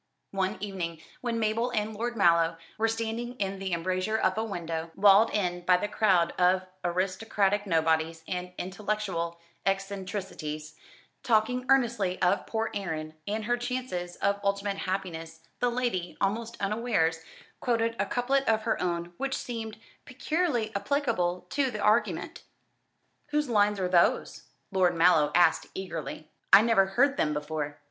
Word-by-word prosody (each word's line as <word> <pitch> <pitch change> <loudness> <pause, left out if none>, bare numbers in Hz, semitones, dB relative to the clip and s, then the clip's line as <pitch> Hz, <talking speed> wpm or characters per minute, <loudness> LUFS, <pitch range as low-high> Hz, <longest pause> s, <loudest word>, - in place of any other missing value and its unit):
One 195 +1 -1
evening, 180 -5 -4 0.2
when 235 -2 -1
Mabel 225 +2 +1
and 220 -2 -1
Lord 235 +2 -3
Mallow 170 -3 +4 0.2
were 225 - +3
standing 230 +2 -3
in 195 -4 -3
the 195 -1 -3
embrasure 185 +5 0
of 185 -3 +1
a 220 - -1
window, 165 -6 -4
walled 205 +2 +6
in 180 -4 -1
by 180 0 +5
the 205 - -2
crowd 190 -5 +2
of 185 +1 +3 0.2
aristocratic 195 +3 0
nobodies 160 -1 +1
and 180 0 -4
intellectual 185 -3 -3 0.2
eccentricities, 190 -6 -3 0.5
talking 250 +2 +1
earnestly 235 -8 +2
of 185 +2 +2
poor 225 0 -1
Erin 160 -6 -4
and 215 +1 -2
her 240 +2 +1
chances 245 -8 -4
of 200 0 0
ultimate 200 0 0
happiness, 165 -4 -4 0.2
the 245 - +2
lady, 235 -8 -2
almost 225 +4 -1
unawares, 200 -6 +1 0.4
quoted 230 -1 0
a - - +1
couplet 270 +3 +1
of 220 -1 +2
her - - 0
own 175 -1 -2
which 275 0 -2
seemed 225 -3 -5 0.3
peculiarly 255 -4 -1
applicable 200 -7 0
to 275 -2 +1
the 220 - -5
argument. 210 +3 +1 0.9
"Whose 295 -2 0
lines 205 -2 +3
are 185 - 0
those?" 180 -1 +2 0.3
Lord 185 -2 +3
Mallow 165 -3 +4
asked 175 0 +4
eagerly; 170 -4 -5 0.2
"I 205 - +9
never 225 -4 +4
heard 275 +8 +2
them 150 -1 +1
before." 150 -1 -3
195 Hz, 145 wpm, -28 LUFS, 175-225 Hz, 0.9 s, I